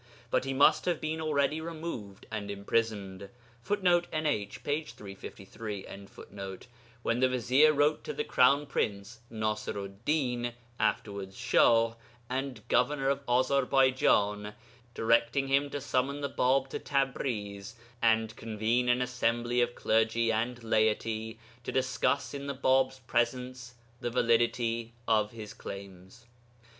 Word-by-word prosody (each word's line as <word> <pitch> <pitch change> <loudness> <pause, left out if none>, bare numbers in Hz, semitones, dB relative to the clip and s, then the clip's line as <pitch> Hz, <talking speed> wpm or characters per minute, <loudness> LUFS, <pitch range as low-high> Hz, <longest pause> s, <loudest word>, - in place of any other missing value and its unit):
But - - +1
he 135 - -2
must 155 +3 +5
have 175 - 0
been 160 +1 -3
already 150 0 +1
removed 155 - -6
and 105 -2 -4
imprisoned, 100 -2 -2 0.3
[Footnote: 175 - +2
NH, 145 -11 -2
p. 145 +2 0
353.] 100 -3 -9 0.4
when 115 - 0
the 130 0 +4
vizier 130 +5 +4
wrote 150 +1 +2
to - - -3
the - - -2
Crown 140 +3 +4
Prince 105 -2 -3
(Nasiru'd 105 -2 -3
Din, 125 -5 0 0.3
afterwards 100 -3 -2
Shah) 115 -2 +4 0.4
and 130 -4 -4
governor 135 +2 +2
of 140 0 0
Azarbaijan 125 -5 +2 0.4
directing 115 +4 +2
him 140 +1 +2
to 145 - -4
summon 140 +1 -1
the 140 - -2
Bāb 130 +1 +2
to - - -4
Tabriz 115 -7 -2 0.3
and 110 -1 +2
convene 115 +2 0
an 125 +1 +3
assembly 120 -1 0
of 120 0 0
clergy 115 +1 +2
and 120 +2 -2
laity 110 0 0 0.3
to - - -4
discuss 130 +1 0
in 140 0 -5
the 140 - -3
Bāb's 130 0 +2
presence 125 +1 -2 0.2
the - - -2
validity 115 -1 +1
of 105 -2 +3
his 110 -2 -9
claims. 100 +4 -10
120 Hz, 125 wpm, -30 LUFS, 110-135 Hz, 0.4 s, must